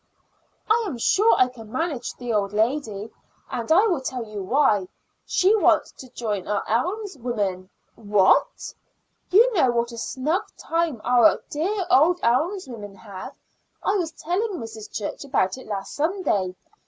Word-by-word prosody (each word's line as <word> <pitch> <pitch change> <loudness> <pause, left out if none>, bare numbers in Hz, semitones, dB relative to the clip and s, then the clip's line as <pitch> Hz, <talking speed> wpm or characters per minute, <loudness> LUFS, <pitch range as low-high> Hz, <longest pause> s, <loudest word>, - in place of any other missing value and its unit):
"I 460 +2 +3
am 290 -10 -4
sure 415 - +4
I 255 - +5
can 225 -4 -12
manage 320 -5 -3
the 245 -2 -4
old 200 -1 0
lady, 220 -2 -1 0.4
and 235 +4 -3
I 375 +7 +6
will 350 -10 +1
tell 255 -2 -4
you 210 -2 -6
why. 210 -3 +2 0.4
She 390 +4 +3
wants 430 - +3
to 260 - -13
join 210 -6 -4
our 205 -1 -1
alms 360 - -1
women." 200 -6 -2 0.2
"What?" 205 -3 +2 0.6
"You 460 +6 +5
know 315 - +3
what 235 0 0
a 235 - -7
snug 300 - -1 0.2
time 330 -8 -1
our 250 +5 +4
dear 370 +6 -1
old 335 +6 +5
alms 310 - +1
women 210 -5 -9
have. 195 -2 -9 0.5
I 405 - +1
was 335 -4 -2
telling 385 +8 -2
Mrs. 225 - -7
Church 210 - -4
about 260 -6 0
it - - -13
last 200 -2 -5
Sunday. 290 - 0
250 Hz, 155 wpm, -24 LUFS, 215-340 Hz, 0.6 s, I